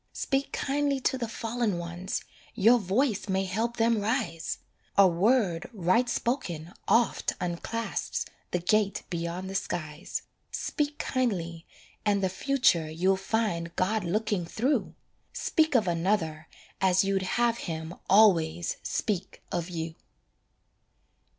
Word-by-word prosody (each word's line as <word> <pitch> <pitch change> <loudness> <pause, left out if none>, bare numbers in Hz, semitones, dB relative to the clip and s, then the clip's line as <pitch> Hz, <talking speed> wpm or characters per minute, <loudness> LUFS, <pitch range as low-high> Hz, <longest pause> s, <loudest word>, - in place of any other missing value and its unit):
Speak 275 0 -1
kindly 280 0 0
to 265 - +1
the 245 -3 -2
fallen 225 -3 -1
ones, 175 +2 -4 0.3
Your 235 +4 +6
voice 205 +1 0
may 190 0 +1
help 230 +5 -1
them 225 -2 +3
rise; 205 -7 -1 0.4
A 200 -1 +8
word 185 -1 +2
right 205 +5 +2
spoken 180 - -2
oft 235 0 +3
unclasps 180 +6 -2 0.2
The - - 0
gate 200 +3 +1
beyond 170 +2 -3
the 190 - -5
skies. 155 -3 -3 0.3
Speak 295 -1 -2
kindly, 175 -10 -1 0.4
and 200 -2 +2
the 190 - +2
future 190 - +2
You'll 180 +5 +2
find 190 -4 -1
God 210 +3 +1
looking 205 +1 0
through! 240 - 0 0.4
Speak 315 -3 +1
of 220 -5 +4
another 165 -3 0 0.3
as 185 0 +4
you'd 195 0 +1 0.2
have 235 -1 +2
Him 160 +1 -4 0.2
always 175 -5 +4
speak 200 -5 -2
of 175 0 -2
you. 165 -2 -4
195 Hz, 125 wpm, -28 LUFS, 170-230 Hz, 0.4 s, A